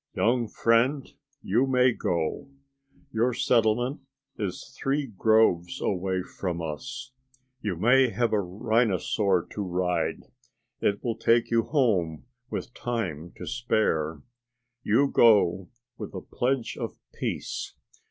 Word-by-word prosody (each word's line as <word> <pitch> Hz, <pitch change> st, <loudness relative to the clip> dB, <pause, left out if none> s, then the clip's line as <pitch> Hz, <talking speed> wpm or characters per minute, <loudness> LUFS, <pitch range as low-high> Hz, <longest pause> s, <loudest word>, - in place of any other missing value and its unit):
"Young 120 Hz, +1 st, +2 dB
friend, 120 Hz, +6 st, +2 dB, 0.4 s
you 120 Hz, +8 st, +2 dB
may 125 Hz, -1 st, +4 dB
go. 85 Hz, -1 st, -2 dB, 0.6 s
Your 115 Hz, +2 st, +1 dB
settlement 120 Hz, +4 st, +2 dB, 0.4 s
is 100 Hz, -5 st, -5 dB
three 140 Hz, +2 st, 0 dB
groves 110 Hz, -6 st, +2 dB
away 95 Hz, -1 st, -1 dB
from 90 Hz, -2 st, -4 dB
us. 125 Hz, +11 st, -6 dB, 0.5 s
You 105 Hz, -4 st, -2 dB
may 125 Hz, +8 st, +4 dB
have 120 Hz, 0 st, 0 dB
a 105 Hz, -, +3 dB
rhinosaur 100 Hz, -2 st, +1 dB
to 105 Hz, -, -4 dB
ride. 90 Hz, -1 st, -1 dB, 0.6 s
It 100 Hz, 0 st, 0 dB
will 115 Hz, -2 st, -2 dB
take 115 Hz, +1 st, +3 dB
you 115 Hz, -1 st, +3 dB
home 95 Hz, -, +1 dB, 0.2 s
with -, -, -5 dB
time 90 Hz, -9 st, -3 dB
to -, -, -7 dB
spare. 80 Hz, -10 st, 0 dB, 0.6 s
You 125 Hz, +5 st, +3 dB
go 95 Hz, -8 st, +4 dB, 0.3 s
with 105 Hz, -2 st, -7 dB
a 95 Hz, -, -4 dB
pledge 125 Hz, +3 st, -2 dB
of -, -, -4 dB, 0.2 s
peace. -, -, -4 dB
110 Hz, 120 wpm, -27 LUFS, 90-120 Hz, 0.6 s, may